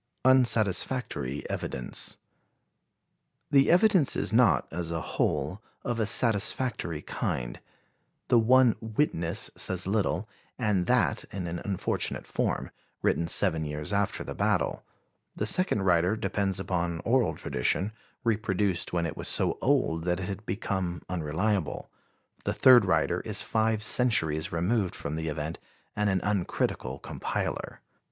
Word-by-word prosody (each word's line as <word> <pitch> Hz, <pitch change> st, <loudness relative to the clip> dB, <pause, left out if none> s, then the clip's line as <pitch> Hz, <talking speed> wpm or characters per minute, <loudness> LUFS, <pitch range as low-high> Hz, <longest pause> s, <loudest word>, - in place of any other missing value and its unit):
Unsatisfactory 115 Hz, -, +2 dB
Evidence. 65 Hz, -, -3 dB, 1.3 s
The 140 Hz, -1 st, +5 dB
evidence 180 Hz, -4 st, +4 dB
is -, -, -1 dB
not, 115 Hz, -5 st, +4 dB
as 85 Hz, 0 st, -4 dB
a 85 Hz, -1 st, -2 dB
whole, 75 Hz, +4 st, -2 dB, 0.2 s
of 120 Hz, -1 st, -2 dB
a 110 Hz, -, +1 dB
satisfactory 110 Hz, -, +2 dB
kind; -, -, -3 dB, 0.7 s
the 120 Hz, -, +5 dB
one 125 Hz, +1 st, +5 dB
witness 110 Hz, -, 0 dB
says 95 Hz, -1 st, +1 dB
little, 100 Hz, -1 st, 0 dB, 0.3 s
and 105 Hz, -7 st, 0 dB
that -, -, +2 dB
in 95 Hz, -2 st, -6 dB
an 85 Hz, 0 st, -4 dB
unfortunate 100 Hz, -3 st, -2 dB
form, -, -, -2 dB, 0.3 s
written 85 Hz, -, +1 dB
seven 80 Hz, -3 st, +3 dB
years 75 Hz, +5 st, -4 dB
after 100 Hz, 0 st, 0 dB
the -, -, -6 dB
battle; -, -, 0 dB, 0.5 s
the 105 Hz, -, -2 dB
second 110 Hz, -, +1 dB
writer 90 Hz, +2 st, +3 dB
depends 100 Hz, -3 st, -1 dB
upon 85 Hz, -3 st, -2 dB
oral 125 Hz, 0 st, +1 dB
tradition, 95 Hz, -, -1 dB, 0.3 s
reproduced 105 Hz, -5 st, 0 dB
when 85 Hz, -1 st, 0 dB
it 85 Hz, -, -4 dB
was -, -, -6 dB
so -, -, +1 dB
old 80 Hz, +1 st, +1 dB
that 90 Hz, 0 st, 0 dB
it 90 Hz, -, -4 dB
had 100 Hz, +2 st, -7 dB
become 95 Hz, -4 st, -3 dB
unreliable; 90 Hz, +1 st, -2 dB, 0.5 s
the -, -, -1 dB
third 125 Hz, -5 st, +7 dB
writer 95 Hz, -, +1 dB
is -, -, -2 dB
five 110 Hz, -1 st, 0 dB
centuries 100 Hz, -9 st, +2 dB
removed 95 Hz, +4 st, 0 dB
from 70 Hz, -, -5 dB
the 80 Hz, 0 st, -3 dB
event 75 Hz, +1 st, -4 dB, 0.4 s
and 105 Hz, -1 st, +1 dB
an 95 Hz, -1 st, +1 dB
uncritical 90 Hz, -9 st, -1 dB
compiler. -, -, -4 dB
95 Hz, 130 wpm, -28 LUFS, 85-110 Hz, 1.3 s, third